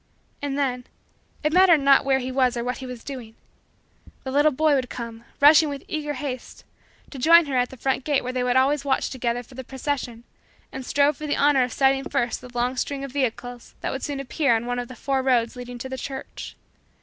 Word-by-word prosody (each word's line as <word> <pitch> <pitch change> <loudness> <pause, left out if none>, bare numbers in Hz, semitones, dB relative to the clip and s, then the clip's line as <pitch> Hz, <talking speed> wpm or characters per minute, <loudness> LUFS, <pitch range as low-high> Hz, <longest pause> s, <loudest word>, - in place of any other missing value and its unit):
And 285 -1 -3
then 250 -3 -1 0.6
it 305 +1 +1
mattered 365 -2 +7
not 275 0 +5
where 270 -1 +3
he 260 0 -4
was 255 -2 +2
or 235 - -2
what 250 +1 -3
he 260 - -7
was 250 -2 -8
doing 245 -5 -8 0.9
the 265 - -4
little 290 +3 +4
boy 310 +2 +2
would 260 -3 0
come, 230 -1 -7
rushing 300 +2 +7
with 280 -1 -6
eager 295 -2 -3
haste, 255 -2 -6 0.5
to 275 - -8
join 335 +5 +7
her 280 -2 -3
at 250 0 +2
the 265 - -12
front 265 +1 -1
gate 290 -1 +1
where 255 +1 -4
they 255 - -1
always 260 +3 +2
watched 275 -2 0
together 245 -2 -2
for 250 - -18
the 260 +1 -7
procession 255 -3 -4 0.5
and 260 -1 -7
strove 285 0 +2
for 305 - -6
the 290 - 0
honor 285 -2 +4
of 250 - -3
sighting 270 0 +2
first 240 -1 -1
the 250 - -11
long 245 +2 0
string 275 +1 -2
of 275 - -6
vehicles 245 -2 -3
that - - -2
would 265 - -4
soon 285 -2 -3
appear 275 -1 +1
on 225 +1 -2
one 245 0 -2
of 245 - -4
the 255 - -10
four 270 +2 -1
roads 245 -3 +1
leading 245 0 -8
to 245 - -6
the 260 0 -5
church. 270 -1 -7
265 Hz, 225 wpm, -24 LUFS, 245-285 Hz, 0.9 s, mattered